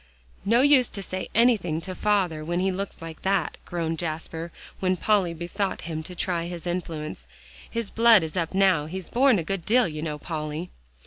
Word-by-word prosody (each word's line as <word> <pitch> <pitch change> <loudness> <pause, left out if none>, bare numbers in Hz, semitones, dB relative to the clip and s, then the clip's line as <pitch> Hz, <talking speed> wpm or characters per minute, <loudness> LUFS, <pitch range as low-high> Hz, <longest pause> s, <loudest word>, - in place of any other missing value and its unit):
"No 235 +4 +4
use 280 -4 +5
to 200 - -6
say 185 0 -4
anything 210 -9 +3
to 185 +2 -5
father 185 -6 +1
when 175 +3 -1
he 190 +1 +1
looks 190 -2 -5
like 165 -1 -8
that," 190 -4 0
groaned 165 -2 -2
Jasper, 165 0 -4 0.3
when 185 -1 +1
Polly 200 -3 +2
besought 175 +4 -3
him 160 -1 -4
to 180 +3 -9
try 170 -1 -1
his 175 -1 -6
influence, 160 - -4 0.4
"his 230 -3 -3
blood 230 -4 +6
is 160 -1 -5
up 170 0 -1
now; 190 -6 +4
he's 185 +1 -6
borne 255 -1 +5
a 170 - -1
good 195 +1 -3
deal, 245 +3 +4
you 155 -2 -5
know, 155 -2 -3
Polly." 155 +2 -4
175 Hz, 190 wpm, -26 LUFS, 160-195 Hz, 0.4 s, blood